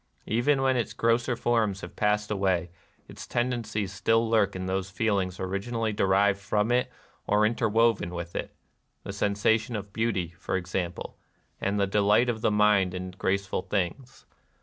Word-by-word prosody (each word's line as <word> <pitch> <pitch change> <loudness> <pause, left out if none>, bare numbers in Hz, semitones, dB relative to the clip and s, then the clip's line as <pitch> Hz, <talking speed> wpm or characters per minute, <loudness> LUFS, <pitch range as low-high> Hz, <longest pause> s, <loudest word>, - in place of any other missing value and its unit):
Even 135 +5 +1
when 130 -1 +2
its 120 - -2
grosser 115 +2 +1
forms 110 -5 0
have 90 - -9
passed 105 0 0
away, 95 -3 0 0.4
its - - -10
tendencies 110 -5 -2
still 115 +4 +2
lurk 105 -4 +2
in 95 0 -4
those 95 +1 -2
feelings 95 -2 -1
originally 110 +4 -2
derived 100 0 +2
from 105 +3 0
it 125 +1 +1 0.4
or 105 +1 +3
inter 115 +1 +1
woven 115 -4 +2
with 85 -1 -6
it, - - -4 0.2
— - - -47
the 100 - -6
sensation 105 +3 +1
of 100 -1 -6
beauty, 110 -7 -1
for - - -2
example, 90 -1 -4 0.4
and 100 +1 -1
the 100 - +3
delight 105 +4 +3
of 110 -2 -2
the - - +3
mind 105 -3 +3
in 90 0 -5
grace 100 +1 -1
ful 95 - -2
things. 105 +9 -4
105 Hz, 170 wpm, -27 LUFS, 95-115 Hz, 0.4 s, or